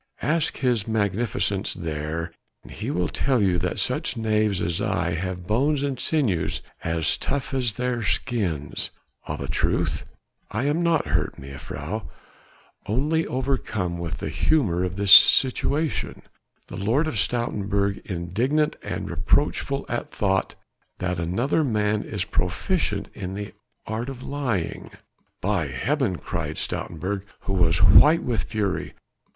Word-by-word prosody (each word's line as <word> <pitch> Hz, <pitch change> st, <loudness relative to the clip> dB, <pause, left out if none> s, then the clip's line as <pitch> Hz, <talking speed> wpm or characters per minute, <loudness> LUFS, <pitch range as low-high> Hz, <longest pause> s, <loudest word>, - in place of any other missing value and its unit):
"Ask 160 Hz, 0 st, +1 dB
his 120 Hz, -6 st, +1 dB
Magnificence 105 Hz, -2 st, 0 dB
there, 80 Hz, +1 st, -3 dB, 0.4 s
he -, -, -5 dB
will 90 Hz, -1 st, 0 dB
tell 130 Hz, -, +1 dB
you 95 Hz, -4 st, +2 dB
that 90 Hz, +2 st, -2 dB
such -, -, 0 dB
knaves 110 Hz, -3 st, +1 dB
as 85 Hz, +2 st, -1 dB
I 90 Hz, -5 st, 0 dB
have 90 Hz, +1 st, -3 dB
bones 135 Hz, +8 st, +1 dB
and 135 Hz, -3 st, -2 dB
sinews 125 Hz, -, 0 dB, 0.2 s
as 80 Hz, -1 st, +1 dB
tough 140 Hz, -1 st, -2 dB
as 125 Hz, -6 st, +1 dB
their 125 Hz, -1 st, -1 dB
skins. 100 Hz, -, -1 dB, 0.4 s
Of -, -, -4 dB
a -, -, -3 dB
truth -, -, 0 dB, 0.5 s
I 110 Hz, +4 st, -2 dB
am 145 Hz, +4 st, +1 dB
not 170 Hz, -2 st, +2 dB
hurt, -, -, -1 dB
mejuffrouw... 70 Hz, +8 st, -6 dB, 0.8 s
only 150 Hz, +9 st, +1 dB
overcome 115 Hz, -9 st, -1 dB
with 85 Hz, -2 st, -4 dB
the -, -, -4 dB
humour 100 Hz, -, +2 dB
of 90 Hz, 0 st, -2 dB
this 100 Hz, 0 st, +1 dB
situation. 140 Hz, +7 st, +5 dB, 0.4 s
The -, -, -7 dB
Lord 115 Hz, +11 st, +2 dB
of 115 Hz, -10 st, -1 dB
Stoutenburg 100 Hz, -3 st, 0 dB
indignant 115 Hz, -, 0 dB
and -, -, -4 dB
reproachful 140 Hz, 0 st, 0 dB
at 120 Hz, -, -3 dB
thought 95 Hz, -2 st, 0 dB, 0.4 s
that 90 Hz, -2 st, -2 dB
another 115 Hz, -, +1 dB
man 105 Hz, -4 st, +1 dB
is 100 Hz, -4 st, -3 dB
proficient 100 Hz, -, -1 dB
in 95 Hz, -1 st, -5 dB
the 100 Hz, 0 st, -6 dB, 0.3 s
art 115 Hz, +4 st, -3 dB
of 130 Hz, -2 st, -8 dB
lying." 125 Hz, -, -2 dB, 0.5 s
"By -, -, 0 dB
heaven," -, -, 0 dB
cried -, -, -4 dB
Stoutenburg 95 Hz, +4 st, -3 dB, 0.2 s
who 95 Hz, -, -3 dB
was 85 Hz, 0 st, +3 dB
white 155 Hz, +8 st, +7 dB
with 115 Hz, -4 st, -1 dB
fury. 105 Hz, -4 st, -2 dB
105 Hz, 135 wpm, -24 LUFS, 90-130 Hz, 0.8 s, white